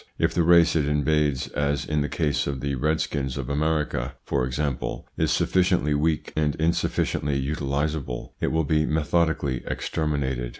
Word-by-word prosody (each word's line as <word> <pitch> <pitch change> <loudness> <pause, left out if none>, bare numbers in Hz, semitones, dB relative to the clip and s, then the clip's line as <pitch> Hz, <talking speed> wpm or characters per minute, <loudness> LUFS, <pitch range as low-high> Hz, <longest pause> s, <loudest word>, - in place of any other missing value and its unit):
If - - +1
the 85 - +2
race 85 0 +5
it 75 -3 +2
invades, 75 -1 +1
as 70 -1 -1
in 75 -1 0
the 75 - -1
case 75 -4 0
of 70 -2 -2
the 70 +1 -2
Redskins 70 -1 -1
of 70 -1 -4
America, 75 -4 -1
for 65 -3 0
example, 70 0 -3
is - - +1
sufficiently 90 -5 +2
weak, 75 +2 0
and 75 -1 +1
insufficiently 80 -3 0
utilisable, 70 -1 -2
it - - +1
will 80 0 +1
be 75 +1 +1
methodically 80 -4 +1
exterminated. 65 -5 -2
75 Hz, 155 wpm, -25 LUFS, 70-80 Hz, -, race